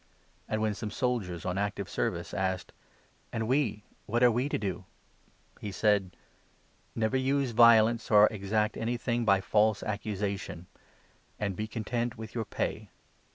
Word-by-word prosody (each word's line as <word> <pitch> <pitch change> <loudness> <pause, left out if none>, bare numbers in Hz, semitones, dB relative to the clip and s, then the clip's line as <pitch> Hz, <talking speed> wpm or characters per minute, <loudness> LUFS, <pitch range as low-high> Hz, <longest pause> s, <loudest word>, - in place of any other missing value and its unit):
And 110 0 0
when 110 -1 +1
some 105 +1 -5
soldiers' 105 -8 -2
on 90 +1 -1
active 100 -1 -2
service - - -2
14 95 - -2
asked 95 -1 -2 0.3
" - - -36
And 110 -1 -2
we— 125 -6 +1 0.2
what 120 +3 +1
are 120 - +7
we 125 +5 0
to - - 0
do? 95 -4 -4 0.4
", - - -31
he 105 - -4
said: 100 -2 +1 0.4
" - - -36 0.3
Never 110 +3 +1
use 135 0 +1
violence, 115 0 +5
or 105 -1 +7
exact 105 +1 -1
anything 120 0 -1
by 100 -2 +4
false 105 +1 +2
accusation; 100 -4 -3 0.7
and 100 -3 -2
be 110 +3 -3
content 115 +1 -3
with 110 0 -8
your 115 -2 -2
pay. - - -3
110 Hz, 160 wpm, -29 LUFS, 100-115 Hz, 0.7 s, are